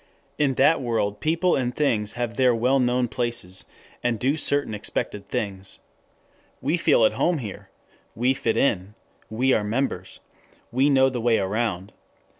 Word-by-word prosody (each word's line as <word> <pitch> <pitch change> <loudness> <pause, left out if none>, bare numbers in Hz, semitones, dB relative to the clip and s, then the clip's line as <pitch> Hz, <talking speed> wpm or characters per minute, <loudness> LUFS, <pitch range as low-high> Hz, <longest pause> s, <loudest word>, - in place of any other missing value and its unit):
In 140 -3 +2
that 140 +4 +4
world 110 -4 -1
people 165 +3 +1
and 125 -1 -1
things 110 -8 0
have 120 -1 -3
their 125 -2 +3
well 125 +4 +2
known 125 0 +1
places, 115 -6 -2 0.4
and 120 -1 +1
do 135 +7 +1
certain 145 -6 0
expected 105 -1 -4
things. 95 -2 -4 0.8
We 145 +6 0
feel 155 -9 +4
at - - +4
home 175 -1 +1
there. 110 -8 -8 0.5
We 125 +3 +2
fit 115 -3 -1
in. 100 -5 0 0.3
We 130 +4 +1
are 105 - +1
members. 105 -4 -3 0.5
We 130 +4 +3
know 135 -1 +4
the 125 -2 -4
way 115 -1 +3
around. 100 -1 -2
120 Hz, 155 wpm, -24 LUFS, 105-135 Hz, 0.8 s, that